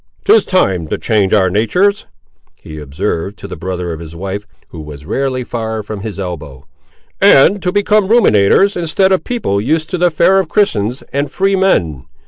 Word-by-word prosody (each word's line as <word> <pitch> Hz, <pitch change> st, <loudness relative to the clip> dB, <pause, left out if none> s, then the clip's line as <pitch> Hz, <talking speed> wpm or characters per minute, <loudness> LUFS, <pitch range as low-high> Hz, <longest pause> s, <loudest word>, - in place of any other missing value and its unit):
"'Tis 435 Hz, +2 st, +5 dB
time 95 Hz, -, 0 dB
to -, -, -3 dB
change 105 Hz, -4 st, 0 dB
our 100 Hz, -3 st, +3 dB
natur's," 180 Hz, -, 0 dB, 0.6 s
he 75 Hz, 0 st, -9 dB
observed 80 Hz, +6 st, -4 dB
to -, -, -9 dB
the 95 Hz, -, -7 dB
brother 90 Hz, -2 st, -4 dB
of 80 Hz, -, -8 dB
his 85 Hz, 0 st, -10 dB
wife, 100 Hz, +3 st, -6 dB, 0.2 s
who 80 Hz, -, -9 dB
was 75 Hz, -1 st, -11 dB
rarely 130 Hz, -, -2 dB
far 110 Hz, -2 st, -4 dB
from 105 Hz, 0 st, -7 dB
his 105 Hz, -1 st, -6 dB
elbow; 80 Hz, -8 st, -7 dB, 0.6 s
"and 190 Hz, +9 st, +5 dB
to 180 Hz, -, -1 dB
become 205 Hz, 0 st, +2 dB
ruminators, 195 Hz, -, +4 dB
instead 180 Hz, +3 st, +1 dB
of 190 Hz, -, +1 dB
people 165 Hz, -, -2 dB
used 155 Hz, +7 st, -1 dB
to 180 Hz, -, -2 dB
the 175 Hz, 0 st, +3 dB
fare 185 Hz, +4 st, +3 dB
of 190 Hz, -, -2 dB
Christians 125 Hz, -, 0 dB
and 140 Hz, +1 st, -1 dB
free 195 Hz, +6 st, 0 dB
men. 85 Hz, -, 0 dB
110 Hz, 180 wpm, -14 LUFS, -, 0.6 s, Tis